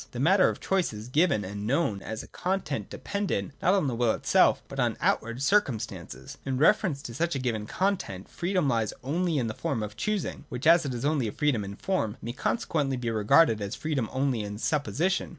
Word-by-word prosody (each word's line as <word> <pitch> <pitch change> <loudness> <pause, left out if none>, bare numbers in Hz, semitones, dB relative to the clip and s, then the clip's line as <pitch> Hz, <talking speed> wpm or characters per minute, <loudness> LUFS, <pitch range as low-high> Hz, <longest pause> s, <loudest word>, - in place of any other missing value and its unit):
The 120 - -5
matter 185 +7 +5
of - - -5
choice 190 -9 0
is 105 +3 -8
given, 145 - +2
and 100 +2 -5
known 125 -7 +1
as 110 +1 -5
a - - -12
content 175 - -3
dependent 200 - -3
not 185 +3 +4
on 190 - +2
the 130 - 0
will 115 -1 +2
itself, - - +3
buLQn. - - -1
outward 115 +4 0
circumstances. 110 - -1
In 130 -1 -2
reference 155 -2 +3
to 120 - -7
such 170 +5 -1
a - - +1
given 115 -5 -2
content, 180 - -2
freedom 180 -3 -1
lies 115 -5 0
only 165 +4 0
in 125 - +1
the 110 - -3
form 115 0 -2
of 105 -1 -6
choosing, 205 - -2
which, 125 -3 -5
as 165 0 +6
it 130 - -3
is 120 - -3
only 145 -5 +1
a - - -3
freedom 140 -7 0
in 100 0 -6
form, 110 - -1
may 120 - -5
consequently 145 - -1
be 120 -2 -2
regarded 110 +2 +4
as 100 +5 -4
free3bm 135 -5 -2
only 130 -3 0
in 105 0 -5
supposition. 160 - 0
130 Hz, 205 wpm, -28 LUFS, 110-165 Hz, -, as